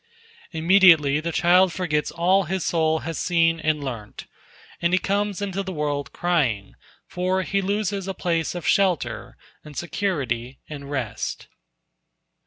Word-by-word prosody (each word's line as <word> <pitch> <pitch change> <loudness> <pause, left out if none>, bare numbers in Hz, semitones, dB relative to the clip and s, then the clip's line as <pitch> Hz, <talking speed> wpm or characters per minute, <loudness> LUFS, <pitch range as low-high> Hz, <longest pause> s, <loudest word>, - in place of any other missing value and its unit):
Immediately 165 -4 +5
the 170 +2 -3
child 180 +2 +4
forgets 155 -3 -1
all 185 +3 +2
his 185 0 -2
soul 160 -1 +1
has 165 -1 -4
seen 165 -2 +2
and 155 -2 0
learnt, 115 -6 -7 0.6
and 170 +1 +1
he - - +5
comes 205 +1 -1
into 195 -1 -2
the 190 -1 -5
world 145 -4 -2
crying, 135 - 0 0.3
for 185 +1 -1
he 195 +1 0
loses 200 0 -2
a 195 - -3
place 165 -2 -1
of 175 - -5
shelter 185 -6 0 0.3
and 150 -2 -12
security 135 -10 -2
and 140 -2 -8
rest. 120 -7 -4
170 Hz, 140 wpm, -23 LUFS, 150-190 Hz, 0.6 s, Immediately